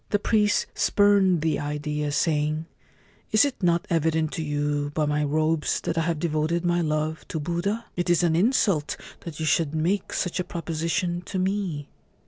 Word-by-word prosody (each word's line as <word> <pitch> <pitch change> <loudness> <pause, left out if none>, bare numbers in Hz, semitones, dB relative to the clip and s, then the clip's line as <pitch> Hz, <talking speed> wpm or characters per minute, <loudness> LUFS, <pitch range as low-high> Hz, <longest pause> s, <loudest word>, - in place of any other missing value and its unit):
The 205 - +2
priest 210 0 +2
spurned 200 -4 +3
the 160 -2 0
idea, 150 0 -2
saying, 155 +1 0 0.3
' - - -33
Is 215 +4 +5
it 275 -5 -4
not 170 -2 +2
evident 160 -1 +1
to - - -4
you 145 -1 -1
by 155 - +2
my 150 0 0
robes 155 +1 +1
that - - -2
I 165 - +1
have 165 0 0
devoted 160 +2 -1
my 175 0 +2
love 155 0 -1
to 160 - -3
Buddha? 175 +8 -2
It 175 0 -1
is 175 0 +3
an 165 -2 +3
insult 195 - +2 0.2
that 165 -3 -8
you 160 - -1
should 155 0 +1
make 180 +5 0
such 180 0 -2
a - - +1
proposition 170 +1 -2
to 195 - -3
me 185 -6 -1
165 Hz, 180 wpm, -25 LUFS, 150-180 Hz, 0.3 s, Is